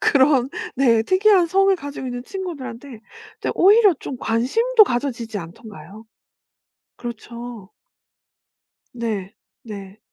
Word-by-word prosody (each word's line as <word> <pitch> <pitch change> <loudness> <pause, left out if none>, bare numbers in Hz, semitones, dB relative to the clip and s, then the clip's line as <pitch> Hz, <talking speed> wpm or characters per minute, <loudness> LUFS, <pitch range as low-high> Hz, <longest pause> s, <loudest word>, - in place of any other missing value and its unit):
그런 265 -2 +3 0.3
네 235 -4 +4
특이한 375 - +4
성을 390 +3 +3
가지고 285 -4 -7
있는 245 -1 -5
친구들한테 280 - -7 0.4
이제 - - -2
오히려 410 +2 +6
좀 265 - -6
관심도 430 - +3
가져지지 240 - -3
않던가요? 200 +4 -11 0.9
그렇죠. 235 -3 -8 1.2
네. 215 -5 -4 0.3
네. 200 -2 -9
245 Hz, 235 characters per minute, -21 LUFS, 225-345 Hz, 1.2 s, 오히려